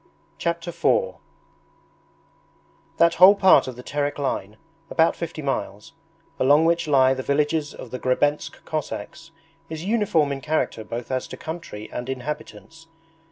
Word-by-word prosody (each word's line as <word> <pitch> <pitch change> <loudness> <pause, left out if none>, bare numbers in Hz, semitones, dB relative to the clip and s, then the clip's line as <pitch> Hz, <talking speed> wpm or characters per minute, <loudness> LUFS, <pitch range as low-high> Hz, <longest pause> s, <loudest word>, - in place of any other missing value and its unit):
Chapter 170 0 -2
IV 125 - +1 1.8
That 170 0 +5
whole 185 +4 +9
part 190 -7 +5
of 130 - -6
the 125 - -10
Terek 145 +1 -2
line 110 -7 -3 0.3
(about 160 0 +3
fifty 165 -2 -6
miles) 105 -7 -4 0.5
along 145 +4 +5
which 170 0 +1
lie 130 -2 +4
the 130 - -4
villages 145 +2 0
of 120 - -10
the 130 - -5
Grebensk 145 +4 -1
Cossacks 155 0 -5 0.4
is 160 +1 -6
uniform 200 -9 +2
in 135 -1 -4
character 155 -7 -1
both 115 +3 -6
as 130 0 -2
to - - -9
country 160 -10 -7
and 120 +1 -5
inhabitants. 150 +4 -7
145 Hz, 140 wpm, -23 LUFS, 130-165 Hz, 1.8 s, whole